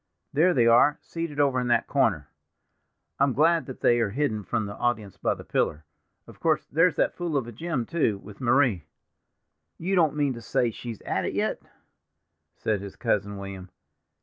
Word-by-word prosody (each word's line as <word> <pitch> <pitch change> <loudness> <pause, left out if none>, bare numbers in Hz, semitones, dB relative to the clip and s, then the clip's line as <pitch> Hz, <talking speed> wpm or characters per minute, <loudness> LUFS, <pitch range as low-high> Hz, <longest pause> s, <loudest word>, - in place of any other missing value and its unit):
There 170 +6 +4
they 120 -3 +4
are, 120 +6 +5
seated 165 -3 -5
over 140 -3 +3
in 125 - -2
that 120 - +2
corner. - - +1 0.9
I'm 140 -1 +3
glad 165 +4 +3
that 130 - -9
they 120 0 +4
are 115 -3 +1
hidden 110 -3 -1
from 110 +1 -1
the 100 - -6
audience 110 -6 -2
by - - 0
the - - -10
pillar. 75 +1 -1 0.4
Of - - -15
course, - - +1
there's 165 +3 +2
that - - +1
fool 170 -4 -2
of 135 - -1
a 120 - -8
Jim, 135 0 -3
too, 150 -11 0
with 100 +3 -13
Marie." 120 - +2 0.9
"You 185 +4 -2
don't 160 -6 +3
mean 145 -3 +1
to 115 - -9
say 115 +1 0
she's 115 -1 -8
at - - -2
it - - -3
yet?" - - -1 0.9
said 105 -3 -1
his 100 -1 -8
cousin 100 0 -1
William. 95 -2 -8
120 Hz, 185 wpm, -26 LUFS, 105-150 Hz, 0.9 s, are